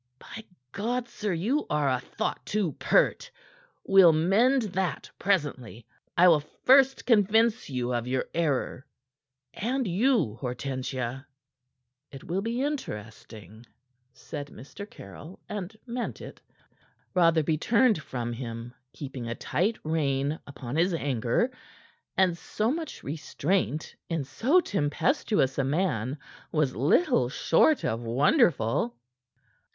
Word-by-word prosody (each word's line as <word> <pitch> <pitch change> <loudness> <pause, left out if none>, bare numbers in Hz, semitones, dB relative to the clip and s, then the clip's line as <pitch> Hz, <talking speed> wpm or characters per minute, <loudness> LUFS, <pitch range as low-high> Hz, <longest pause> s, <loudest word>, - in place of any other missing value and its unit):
"By 220 +10 -10 0.3
God, 240 +4 -2
sir! 215 -4 -4
You 215 - 0
are 150 -2 +1
a 130 -2 +1
thought - - -4
too 205 -6 -1
pert. - - +2 0.6
We'll 190 -4 +7
mend 220 - +3
that 185 -7 -3
presently. 140 - -1 0.3
I 180 +2 +7
will 165 -4 +6
first 265 - +3
convince 225 0 +3
you 125 -2 -2
of 120 0 -2
your 130 0 0
error, 145 -3 -1 0.7
and 250 +3 -1
you, 190 - +1
Hortensia." 130 0 -4 0.8
"It 135 -2 -11
will 180 +3 -2
be 235 +4 -2
interesting," 110 - -6 0.5
said 145 +3 -7
Mr. 200 +10 -10
Caryll, 150 - -11
and 205 +1 -6
meant 240 0 -4
it. - - -10 0.7
Rotherby 165 -3 +3
turned 230 -3 +3
from 120 -4 -4
him, 115 0 -6 0.2
keeping 130 -4 -7
a 115 - -3
tight 200 - -1
rein 145 -1 0
upon 135 -1 -6
his 175 +1 +2
anger; 135 - 0 0.7
and 185 -3 +3
so 215 +6 -2
much 320 +2 -5
restraint 155 +2 -2
in 165 -4 -1
so 270 - +2
tempestuous 195 - 0
a - - +3
man 135 - -1 0.3
was 150 -5 +1
little 135 -1 +3
short 165 - +3
of 115 +1 -1
wonderful. 120 - +2
160 Hz, 120 wpm, -27 LUFS, 130-210 Hz, 0.8 s, We'll